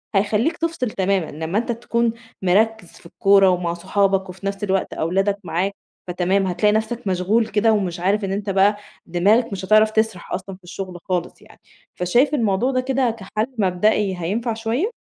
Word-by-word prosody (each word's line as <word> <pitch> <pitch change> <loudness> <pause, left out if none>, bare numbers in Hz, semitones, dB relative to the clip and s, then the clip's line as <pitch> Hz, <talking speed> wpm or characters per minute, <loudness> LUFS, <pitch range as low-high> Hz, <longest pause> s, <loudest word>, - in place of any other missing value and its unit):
هيخلِّيك 210 - +1
تفصل 325 -8 -2
تمامًا 190 -4 0
لمَّا 160 +5 -3
أنتَ 235 +2 0
تكون 235 0 0 0.3
مركز 205 +1 +2
في - - -18
الكورة 195 +2 +4
ومع 175 -2 0
صُحابك، 190 +2 0
وفي 185 +2 -10
نفس 200 0 -3
الوقت 195 -2 0
أولادَك 195 +5 0
معاك. 185 +3 -1 0.3
فتمام، 185 +2 +1
هتلاقي 185 +4 +2
نفسَك 220 +1 -2
مشغول 195 +5 +1
كده، 215 +2 +2
ومش 185 -4 -1
عارِف، 195 +3 +1
إن 190 - -3
أنتَ 200 +1 -3
بقى 195 +2 +3 0.3
دماغك 205 +8 +2
مش 195 -1 -4
هتعرف 215 +2 +5
تسرح 220 -5 -1
أصلًا 195 - -5
في 185 - -23
الشغل 180 0 -7
خالص 180 -2 -3
يعني. - - -19 0.4
فشايِف 240 +11 +2
الموضوع 230 -1 +1
ده 255 -1 +1
كده 260 -1 +1
كحل 215 +1 -3
مبدئي 195 0 +1
هينفع 215 +8 -2
شوية؟ 230 - -1
200 Hz, 170 wpm, -21 LUFS, 185-220 Hz, 0.4 s, هتعرف